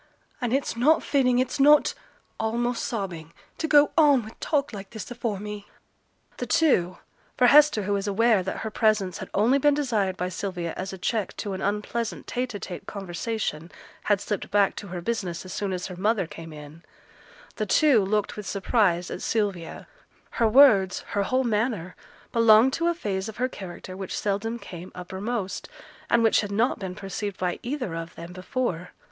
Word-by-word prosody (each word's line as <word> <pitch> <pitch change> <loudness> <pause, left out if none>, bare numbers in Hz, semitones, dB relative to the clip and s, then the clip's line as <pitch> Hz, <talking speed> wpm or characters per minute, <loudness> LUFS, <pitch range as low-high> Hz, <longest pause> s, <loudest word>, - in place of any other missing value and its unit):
And 245 -2 -1
it's 275 -1 0
not 290 +7 +3
fitting, 255 -3 +2
it's 260 +3 0
not' 295 +2 +6 0.5
(almost 235 +2 -1
sobbing), 175 -8 -5 0.3
'to 320 - -1
go 295 -1 +5
on 290 -6 +5
wi' 220 - -9
talk 285 -4 0
like 195 -1 -7
this 220 +1 -8
afore 235 -4 -3
me.' 210 0 -7 0.7
The - - -4
two 185 - +2 0.4
for 250 - +5
Hester, 285 -4 +6
who 205 +1 -1
was 200 0 -1
aware 220 0 +3
that 190 - -4
her 220 - -3
presence 210 -4 +1
had - - -7
only 235 +7 +4
been 290 +1 +4
desired 215 -10 0
by 180 - -1
Sylvia 180 -2 -4
as 190 +1 -4
a 190 - -7
check 210 +3 -2
to 205 -2 -4
an 190 - -5
unpleasant 210 +3 -2
tete 250 -2 -3
a - - -4
tete 180 -3 -8
conversation, 190 -3 -4 0.3
had 205 -2 +3
slipped 205 0 -4
back 200 -1 +3
to 205 - -6
her 180 -1 -5
business 185 -5 -3
as 185 - -7
soon 200 -2 -2
as 185 -1 -3
her 185 - -6
mother 205 +1 +1
came 165 0 -10
in 150 +1 -11 0.8
the 215 - -2
two 265 -1 +4
looked 210 +1 0
with 210 -2 -7
surprise 190 -4 +1
at - - -5
Sylvia; 200 -7 -2 0.4
her 230 - +2
words, 215 -6 +6
her 205 - 0
whole 255 +6 +1
manner, 215 -6 -1 0.4
belonged 230 +2 +6
to 335 +1 0
a 345 - +1
phase 200 - -3
of 220 - -10
her 250 +2 +1
character 185 -5 -9
which 190 -1 -5
seldom 210 +3 -1
came 180 -5 -10
uppermost, 190 +3 -4 0.4
and 235 - +4
which 225 - +4
had 205 - -5
not 225 +6 +1
been 185 -2 -5
perceived 195 +1 -5
by 180 -1 -2
either 250 - -3
of 165 0 -6
them 170 +1 -9
before. 185 -2 -3
210 Hz, 185 wpm, -26 LUFS, 185-240 Hz, 0.8 s, not